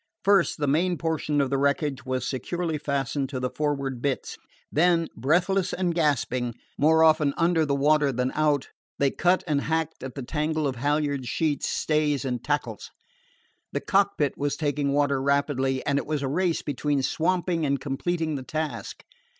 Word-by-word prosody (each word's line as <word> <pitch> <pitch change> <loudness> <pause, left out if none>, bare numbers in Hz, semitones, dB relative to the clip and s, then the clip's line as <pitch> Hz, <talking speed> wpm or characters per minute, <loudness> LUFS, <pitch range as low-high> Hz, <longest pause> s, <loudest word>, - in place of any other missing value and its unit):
First 200 -3 +3
the 150 - -1
main 170 +5 +1
portion 155 -2 -1
of 140 -2 +1
the 135 - +1
wreckage 140 -1 0
was 130 0 -1
securely 160 +4 -2
fastened 140 -1 -2
to 130 -2 -4
the 125 0 -2
forward 140 -4 -2
bitts; 140 -1 -2 0.4
then, 165 +1 +3
breathless 180 - +1
and 180 -2 0
gasping, 130 -7 0 0.2
more 160 +2 +4
often 155 -3 +4
under 165 -2 +2
the 140 - +1
water 145 0 +3
than 125 +1 -1
out, 150 -3 +1 0.3
they 140 -1 +2
cut 180 +1 +2
and 150 -4 +1
hacked 160 0 -2
at 130 -1 -7
the 135 - -5
tangle 155 +3 -1
of 130 -3 -3
halyards, 145 -1 0
sheets, 155 0 0
stays, 150 -3 0
and 125 -2 -3
tackles. 145 0 -2 0.8
The - - 0
cockpit 195 -7 +1
was 145 0 0
taking 145 -2 0
water 140 -1 +1
rapidly, 135 -1 0
and 140 0 +2
it - - -6
was 150 -2 -1
a - - 0
race 170 +4 0
between 145 0 -1
swamping 170 +2 0
and 140 -2 +1
completing 155 +4 -2
the 135 -3 -4
task. 155 +3 -5
145 Hz, 170 wpm, -26 LUFS, 140-160 Hz, 0.8 s, more